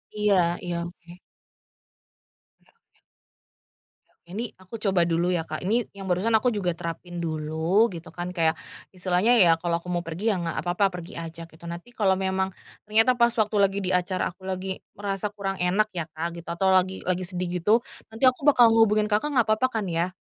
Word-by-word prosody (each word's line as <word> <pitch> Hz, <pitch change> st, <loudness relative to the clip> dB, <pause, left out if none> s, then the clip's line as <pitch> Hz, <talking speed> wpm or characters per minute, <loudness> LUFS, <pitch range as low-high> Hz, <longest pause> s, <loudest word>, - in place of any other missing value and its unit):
Iya 210 Hz, -1 st, +3 dB, 0.3 s
iya, 175 Hz, -1 st, -3 dB
oke. 175 Hz, -1 st, -21 dB, 1.6 s
Ya, -, -, -28 dB
oke. 460 Hz, -, -40 dB, 1.1 s
Ya, -, -, -37 dB, 0.2 s
ini 230 Hz, -, -2 dB, 0.2 s
aku 185 Hz, +4 st, -10 dB
coba 195 Hz, -4 st, +2 dB
dulu 170 Hz, +1 st, +1 dB
ya, 165 Hz, -, -1 dB
Kak, 155 Hz, -, -4 dB
ini 230 Hz, +4 st, +2 dB
yang 195 Hz, -1 st, -7 dB
barusan 185 Hz, +5 st, +1 dB
aku 235 Hz, +3 st, +3 dB
juga 195 Hz, -5 st, -1 dB
terapin 170 Hz, +1 st, -6 dB
dulu 160 Hz, +7 st, +1 dB
gitu 170 Hz, 0 st, -8 dB
kan, 175 Hz, +1 st, -5 dB
kayak, 160 Hz, -1 st, +2 dB, 0.4 s
istilahnya 185 Hz, +6 st, +2 dB
ya 165 Hz, -2 st, +6 dB
kalau 170 Hz, -1 st, -1 dB
aku -, -, -12 dB
mau 175 Hz, -, 0 dB
pergi, 175 Hz, +7 st, -1 dB
ya 205 Hz, -, 0 dB
enggak 165 Hz, -1 st, -3 dB
apa-apa 180 Hz, +3 st, +1 dB
pergi 175 Hz, +1 st, -8 dB
aja 165 Hz, 0 st, -7 dB
gitu. 160 Hz, 0 st, -20 dB
Nanti 170 Hz, +6 st, -7 dB
kalau 195 Hz, -3 st, +3 dB
memang 190 Hz, 0 st, -1 dB, 0.4 s
ternyata 225 Hz, +4 st, +4 dB
pas 235 Hz, 0 st, +5 dB
waktu 215 Hz, -1 st, +1 dB
lagi 195 Hz, 0 st, +1 dB
di 185 Hz, -, -1 dB
acara 180 Hz, 0 st, 0 dB
aku 185 Hz, +2 st, -23 dB
lagi, 190 Hz, 0 st, -3 dB, 0.2 s
merasa 200 Hz, 0 st, -2 dB
kurang 195 Hz, -1 st, -3 dB
enak 200 Hz, +4 st, +2 dB
ya 170 Hz, -, -1 dB
Kak, 170 Hz, +2 st, -4 dB
gitu, 170 Hz, -, -14 dB
atau 190 Hz, +2 st, +2 dB
lagi 185 Hz, +1 st, +1 dB
lagi 185 Hz, 0 st, 0 dB
sedih 180 Hz, -1 st, -3 dB
gitu, 215 Hz, +7 st, +4 dB, 0.3 s
nanti 225 Hz, +4 st, -8 dB
aku 255 Hz, +2 st, +2 dB
bakal 240 Hz, -5 st, +7 dB
menghubungi 215 Hz, -1 st, +4 dB
Kakak 220 Hz, +9 st, +1 dB
enggak 235 Hz, -3 st, +3 dB
papa 215 Hz, +4 st, +3 dB
kan 220 Hz, -2 st, -1 dB
ya? 170 Hz, +2 st, 0 dB
185 Hz, 195 wpm, -25 LUFS, 175-210 Hz, 1.6 s, bakal